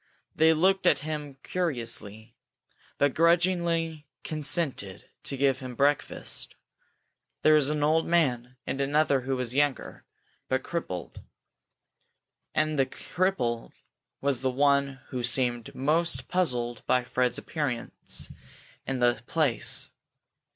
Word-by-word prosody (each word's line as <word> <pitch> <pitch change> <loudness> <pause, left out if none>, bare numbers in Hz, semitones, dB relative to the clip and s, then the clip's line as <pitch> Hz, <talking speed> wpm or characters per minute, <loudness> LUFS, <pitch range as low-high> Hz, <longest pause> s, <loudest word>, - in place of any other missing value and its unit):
They 160 +1 +5
looked 190 +4 +3
at - - +4
him 150 -3 -5
curiously, 115 - -3 0.6
but 145 -1 +2
grudgingly 170 -2 +2 0.2
consented 145 - -1
to 135 - -3
give 135 -1 +2
him 130 -2 -7
breakfast. 145 +3 0 0.9
There 155 - +6
was 150 -2 +4
an 150 -1 0
old 160 +2 +2
man, 125 -7 +1
and 135 +1 -2
another 140 -1 +2
who 135 +1 -2
was 125 -2 -1
younger, 145 -1 0 0.5
but 130 0 0
crippled. 160 - -5 1.3
And 155 -1 +1
this 135 - +3
cripple 130 -11 -2 0.5
was 140 -3 0
the 130 - +1
one 140 0 +2
who 125 - -3
seemed 120 -1 +1
most 160 +5 +1
puzzled 120 -10 0
by 125 0 +3
Fred's 125 0 +1
appearance 140 -7 -2 0.6
in 135 - -1
the 120 0 +3
place. 150 -8 +1
140 Hz, 115 wpm, -28 LUFS, 125-155 Hz, 1.3 s, There